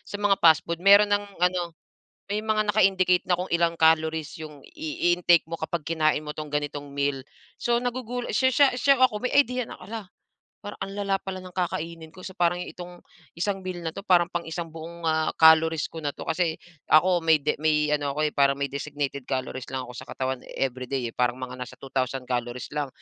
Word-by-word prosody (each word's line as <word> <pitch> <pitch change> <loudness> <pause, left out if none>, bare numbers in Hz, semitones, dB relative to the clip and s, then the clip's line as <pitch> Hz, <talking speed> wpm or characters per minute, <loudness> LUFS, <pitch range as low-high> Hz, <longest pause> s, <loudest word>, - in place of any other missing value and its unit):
sa - - -4
mga 205 -1 +2
fastfood, 165 +1 +4
meron 200 +2 +6
ng 205 0 +2 0.2
ano, 180 -2 0 0.6
may 210 - 0
mga 215 -1 0
naka-indicate 185 -3 +3
na 180 - +3
kung 180 +1 -4
ilang 170 0 +2
calories 160 0 +2
yong 150 -3 -9
i-intake 175 +2 +1
mo 165 0 -6
kapag 160 -1 -3
kinain 155 -2 +1
mo 150 - -5
itong 155 -1 -6
ganitong 145 -1 -3
meal. 140 -1 0 0.4
So, 240 0 +1
nagugulat 245 0 -3
siya 260 0 +4
siya 285 +1 +6
siya 275 +2 +5
ako 210 -5 +1
may 250 - -1
idea 250 -4 +2
na, - - -9
"Hala, 205 +1 -7 0.6
parang 205 0 -8
ang 195 - -4
lala 195 -1 0
pala 190 -1 -5
ng 185 - -10
kakainin 165 -2 -3
ko. 185 0 -14
So, 190 - -6
parang 175 0 +2
itong 180 0 -10 0.4
isang 195 +3 -1
meal 180 -2 -6
na 160 - -2
'to, 195 - -8
parang 175 -3 +4
pang 170 -1 -3
isang 165 0 -5
buong, 170 +1 -9
ah 160 0 +1
calories 160 -1 +5
ko 165 - -7
na 145 - -1
'to." - - -7
Kasi 165 0 0 0.3
ako, 175 +3 +5
may 160 -1 +5
de 150 +1 0
may 150 -1 +2
ano 145 -2 0
ako, 155 0 +1
eh, 150 - -5
parang 140 -1 +4
may 140 -1 -2
designated 140 -1 -4
calories 130 -1 -3
lang 130 -1 -3
ako - - -9
sa - - -9
katawan 130 -1 -3 0.2
every 130 -1 -2
day, 130 -4 -2
eh. - - -36
Parang 125 0 +1
mga 130 0 -6
nasa 125 - -7
2000 135 -1 -2
calories 120 -1 -3
lang. 145 -1 -2
165 Hz, 210 wpm, -25 LUFS, 145-185 Hz, 0.6 s, meron